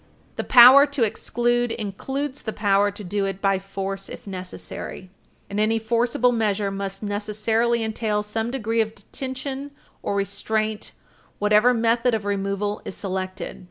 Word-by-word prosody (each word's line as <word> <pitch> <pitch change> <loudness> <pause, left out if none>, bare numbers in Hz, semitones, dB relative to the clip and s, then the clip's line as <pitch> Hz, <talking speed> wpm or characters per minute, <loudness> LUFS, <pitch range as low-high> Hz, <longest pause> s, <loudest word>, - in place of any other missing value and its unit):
The - - -2
power 260 +4 +9
to 285 -4 0
exclude 240 +2 0
includes 265 +7 -4
the 220 - -4
power 205 -1 +3
to 205 +1 -9
do 200 +2 -1
it 195 -1 -4
by 195 -1 +2
force 195 0 -5
if - - -9
necessary. 185 -1 -7 0.4
And 200 +1 -3
any 220 +1 +2
forcible 235 +2 +1
measure 210 -3 0
must 195 0 -5
necessarily 220 +3 0
entail 215 -1 -1
some 220 +2 -3
degree 230 -3 0
of 220 0 -3
detention 265 +5 -6 0.3
or 200 - -2
restraint, 215 +2 -2 0.4
whatever 210 +4 +4
method 230 0 +2
of 215 -2 -4
removal 200 +1 -2
is - - -6
selected. 185 -1 -4
215 Hz, 145 wpm, -23 LUFS, 200-235 Hz, 0.4 s, power